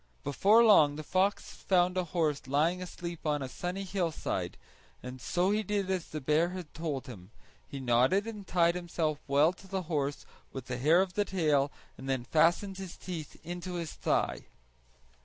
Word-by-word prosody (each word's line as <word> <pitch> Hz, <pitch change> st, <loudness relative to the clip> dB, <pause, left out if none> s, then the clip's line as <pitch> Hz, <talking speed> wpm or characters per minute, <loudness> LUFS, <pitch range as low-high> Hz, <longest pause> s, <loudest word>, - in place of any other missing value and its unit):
Before 205 Hz, -, +5 dB
long 155 Hz, -10 st, +6 dB
the 155 Hz, -, -6 dB
fox 190 Hz, +5 st, 0 dB
found 180 Hz, -1 st, +2 dB
a 185 Hz, -1 st, 0 dB
horse 155 Hz, -5 st, -1 dB
lying 160 Hz, +7 st, +1 dB
asleep 170 Hz, -2 st, -7 dB
on 150 Hz, -2 st, 0 dB
a -, -, -3 dB
sunny 180 Hz, +8 st, -4 dB
hillside; 180 Hz, -4 st, -2 dB, 0.5 s
and 125 Hz, 0 st, -8 dB
so 180 Hz, +8 st, +1 dB
he 210 Hz, +1 st, +2 dB
did 200 Hz, -2 st, -1 dB
as 185 Hz, -3 st, -2 dB
the 155 Hz, -, -5 dB
bear 155 Hz, +5 st, +2 dB
had 180 Hz, -4 st, -8 dB
told 150 Hz, -4 st, -3 dB
him; 95 Hz, -7 st, -10 dB, 0.4 s
he 140 Hz, -, -7 dB
knotted 130 Hz, -, +3 dB
and 210 Hz, -3 st, -7 dB
tied 170 Hz, -1 st, +3 dB
himself 170 Hz, -4 st, -2 dB
well 145 Hz, +5 st, +4 dB
to 190 Hz, +1 st, -16 dB
the 190 Hz, 0 st, -3 dB
horse 145 Hz, -4 st, -2 dB, 0.3 s
with 130 Hz, -2 st, -7 dB
the 125 Hz, -2 st, -4 dB
hair 160 Hz, +7 st, +5 dB
of 185 Hz, -2 st, -7 dB
the 205 Hz, +2 st, +1 dB
tail 150 Hz, -7 st, +1 dB, 0.3 s
and 135 Hz, +1 st, -7 dB
then 130 Hz, -2 st, 0 dB
fastened 170 Hz, +8 st, +2 dB
his 190 Hz, -2 st, -7 dB
teeth 165 Hz, -5 st, -7 dB
into 175 Hz, +2 st, -5 dB
his 170 Hz, -3 st, -4 dB
thigh. -, -, -1 dB
170 Hz, 180 wpm, -30 LUFS, 145-185 Hz, 0.5 s, long